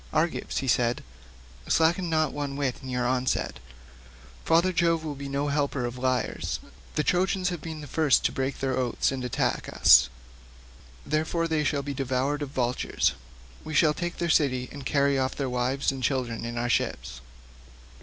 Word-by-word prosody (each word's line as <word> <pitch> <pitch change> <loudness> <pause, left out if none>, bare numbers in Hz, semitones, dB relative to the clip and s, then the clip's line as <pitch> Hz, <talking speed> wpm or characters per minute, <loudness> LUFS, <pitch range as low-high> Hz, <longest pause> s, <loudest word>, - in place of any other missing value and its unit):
"Argives," 160 -3 -1
said 120 0 +1 0.6
he, - - -14
"slacken 170 +2 +2
not 155 -2 +1
one 145 -1 -3
whit 140 -3 -1
in 130 - -8
your 125 -1 -1
onset; 130 +1 0 0.8
father 170 +3 +3
Jove 165 -2 +2
will 155 -2 -3
be 140 0 -7
no 140 +1 -1
helper 140 -3 0
of 120 0 -4
liars; 130 -2 -1 0.4
the 150 - +1
Trojans 180 +1 +1
have 175 -3 -5
been 160 -2 -6
the - - -7
first 150 -2 +2
to - - +3
break 135 +1 -2
their 135 -1 0
oaths 125 -1 0
and 135 -1 -3
to 125 - -2
attack 120 - -1
us; 65 +1 +6 1.0
therefore 160 +2 0
they 160 -2 0
shall 145 -1 0
be 140 0 -4
devoured 135 +2 -1
of 145 - -3
vultures; 125 -2 0 0.5
we 155 - -5
shall 150 0 +5
take 175 +2 -4
their 170 - -1
city 130 -6 +2
and 140 -2 -6
carry 140 -1 +2
off 130 0 -1
their 140 - -2
wives 125 +3 0
and 135 -1 -6
children 125 -3 -1
in 120 0 -5
our 120 +1 0
ships." - - -1
140 Hz, 180 wpm, -27 LUFS, 130-155 Hz, 1.0 s, us